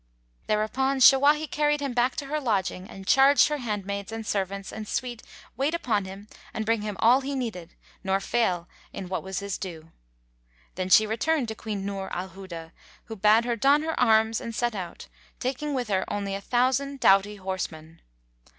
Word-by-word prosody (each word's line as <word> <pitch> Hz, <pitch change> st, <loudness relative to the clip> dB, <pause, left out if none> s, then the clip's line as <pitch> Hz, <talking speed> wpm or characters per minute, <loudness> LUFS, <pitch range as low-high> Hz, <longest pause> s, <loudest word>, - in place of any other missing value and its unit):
Thereupon 260 Hz, +6 st, 0 dB
Shawahi 285 Hz, +4 st, +6 dB
carried 295 Hz, 0 st, +1 dB
him 280 Hz, -3 st, -3 dB
back 245 Hz, +1 st, +1 dB
to 285 Hz, -, -4 dB
her 305 Hz, +2 st, -2 dB
lodging 195 Hz, -7 st, -1 dB
and 195 Hz, 0 st, -10 dB
charged 270 Hz, +7 st, +5 dB
her 300 Hz, -, -1 dB
handmaids 200 Hz, -3 st, -4 dB
and 225 Hz, 0 st, -5 dB
servants 195 Hz, -1 st, -3 dB
and 215 Hz, -1 st, -6 dB
suite 240 Hz, -1 st, -3 dB, 0.3 s
wait 280 Hz, +7 st, 0 dB
upon 220 Hz, -, 0 dB
him 195 Hz, +2 st, -10 dB, 0.3 s
and 220 Hz, -, -2 dB
bring 225 Hz, -1 st, +1 dB
him 210 Hz, -1 st, -4 dB
all 245 Hz, +4 st, +5 dB
he 275 Hz, +1 st, -4 dB
needed 210 Hz, -10 st, -5 dB, 0.3 s
nor 190 Hz, 0 st, +1 dB
fail 185 Hz, -5 st, 0 dB, 0.2 s
in 185 Hz, -2 st, -7 dB
what 185 Hz, -, -2 dB
was 190 Hz, 0 st, -4 dB
his 200 Hz, -1 st, -4 dB
due. 165 Hz, -4 st, -8 dB, 0.8 s
Then 185 Hz, 0 st, -3 dB
she 215 Hz, +3 st, +7 dB
returned 240 Hz, +4 st, 0 dB
to -, -, -3 dB
Queen 210 Hz, -3 st, -5 dB
Nur 195 Hz, -1 st, -4 dB
al 185 Hz, +2 st, -4 dB
Huda, 170 Hz, -3 st, -9 dB, 0.3 s
who 225 Hz, -, -8 dB
bade 215 Hz, +3 st, +4 dB
her 240 Hz, -1 st, 0 dB
don 280 Hz, +6 st, +3 dB
her 320 Hz, 0 st, -2 dB
arms 220 Hz, 0 st, +3 dB
and 230 Hz, -3 st, -6 dB
set 240 Hz, +1 st, 0 dB
out, 185 Hz, -4 st, -7 dB, 0.3 s
taking 275 Hz, +3 st, -2 dB
with 250 Hz, -3 st, -2 dB
her 190 Hz, -2 st, +1 dB
a 200 Hz, -1 st, -3 dB
thousand 260 Hz, +5 st, 0 dB
doughty 195 Hz, 0 st, +4 dB
horsemen. 170 Hz, -4 st, -6 dB
215 Hz, 180 wpm, -26 LUFS, 195-260 Hz, 0.8 s, she